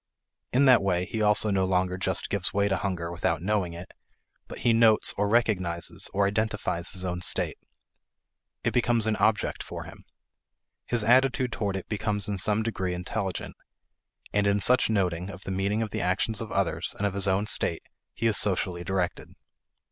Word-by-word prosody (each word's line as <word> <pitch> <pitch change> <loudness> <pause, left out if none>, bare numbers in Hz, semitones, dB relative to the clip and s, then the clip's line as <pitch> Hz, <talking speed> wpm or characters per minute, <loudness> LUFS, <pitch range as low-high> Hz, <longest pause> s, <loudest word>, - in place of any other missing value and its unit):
In 135 +3 +4
that 125 -5 +6
way, 90 -2 0
he 110 +4 -4
also 105 0 +4
no 95 -1 +2
longer 90 -1 +1
just 95 -1 -1
gives 100 -3 -1
way 100 0 +2
to 95 -1 0
hunger 90 -4 -3
without 85 -2 -1
knowing 95 -4 0
it, 85 +2 -10 0.5
but - - -9
he 120 - +5
notes, 115 -1 +4
or 105 +1 0
recognizes, 95 -8 +1
or 100 0 +1
identifies 105 -4 -1
his 95 -1 -3
own 90 -1 -3
state. - - -2 1.0
It - - +1
becomes 120 -2 +2
an 110 -1 +1
object 110 -1 +1
for - - -7
him. - - -13 0.8
His 120 -3 +1
attitude 130 +2 +3
toward 100 -3 -2
it 95 - -5
becomes 105 -1 -2
in 100 -2 -1
some 105 +3 +1
degree 95 -5 -2
intelligent. 95 +1 -4 0.8
And 105 0 +2
in 100 0 +2
such 125 +4 +3
noting 90 -4 0
of 95 -1 -10
the - - -5
meaning 100 +4 0
of 110 - -6
the - - -3
actions 95 +5 0
of 110 - -6
others 100 -3 -1
and 100 - -1
of 100 - 0
his 100 0 -1
own 95 +2 +1
state, 105 - +1 0.3
he 115 - -3
is 110 -2 +3
socially 90 -3 0
directed. 90 -1 -2
100 Hz, 185 wpm, -27 LUFS, 95-110 Hz, 1.0 s, that